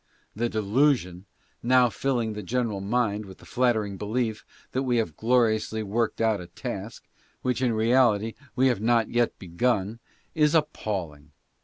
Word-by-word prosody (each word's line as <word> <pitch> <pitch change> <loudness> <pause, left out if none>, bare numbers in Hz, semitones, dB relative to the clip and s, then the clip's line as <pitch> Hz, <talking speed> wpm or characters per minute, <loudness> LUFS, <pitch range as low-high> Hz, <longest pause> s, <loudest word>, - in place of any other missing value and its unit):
The 120 +3 0
delusion 105 -4 +1 0.3
now 125 0 +4
filling 120 -5 -1
the 105 - -5
general 115 0 -1
mind 105 -1 0
with 95 - -11
the - - -17
flattering 110 -6 0
belief 110 +1 -2 0.3
that 130 - -1
we 125 -3 +1
have 90 -10 -1
gloriously 110 -1 +1
worked 110 +3 -1
out 110 -4 +1
a 90 - -9
task, - - -7 0.4
which 125 0 0
in 125 -3 +2
reality 115 -1 +3 0.2
we 130 - +3
have 125 -6 +2
not 115 0 +2
yet 120 0 +1
begun, 100 +4 -1 0.3
is 150 0 +3
appalling. 90 - -2
115 Hz, 150 wpm, -26 LUFS, 105-125 Hz, 0.4 s, now